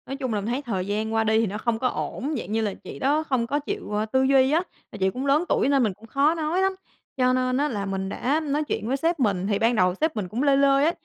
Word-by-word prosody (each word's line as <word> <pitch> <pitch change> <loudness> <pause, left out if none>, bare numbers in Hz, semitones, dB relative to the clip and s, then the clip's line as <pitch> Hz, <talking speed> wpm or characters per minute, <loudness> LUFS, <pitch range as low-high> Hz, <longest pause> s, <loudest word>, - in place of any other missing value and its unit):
Nói 270 - -4
chung 260 -4 -3
là, 210 - 0
mình 200 - -5
thấy 250 +4 -1
thời 195 -8 -3
gian 215 +2 -2
qua 225 0 +2
đi 220 0 +2
thì 225 - +1
nó 200 +2 -4
không 225 0 -1
có 255 - +1
ổn, 280 +3 -3
dạng 210 -4 -6
như 225 +1 +1
là 210 -3 -1
chị - - -10
đó 295 +4 +1
không 260 -6 -1
có 285 +4 0
chịu, 400 - -5
ơ, 210 +1 0
tư 260 +4 +1
duy 265 0 +4
á, 330 +4 +2 0.3
mà - - -8
chị 190 0 +2
cũng 255 +8 -5
lớn 285 +4 +3
tuổi - - +2
nên 275 -2 +3
mình 215 -4 0
cũng 225 +5 -17
khó 280 +7 +2
nói 325 +3 0
lắm. 385 0 +1 0.4
Cho 255 -1 +3
nên 255 0 +1
á 290 +2 +1
là 205 -6 -3
mình 190 -1 -3
đã 280 +9 0
nói 300 -1 -1
chuyện 250 -6 -3
với 265 +3 0
sếp 330 +3 0
mình, 195 -6 +1
thì 205 -1 0
ban 230 +2 +2
đầu 180 -3 +3
sếp 315 0 +1
mình 205 -4 -3
cũng 230 +9 -2
lơi 280 -1 +4
lơi 275 0 +4
á, 325 - +3
255 Hz, 310 wpm, -24 LUFS, 215-285 Hz, 0.4 s, duy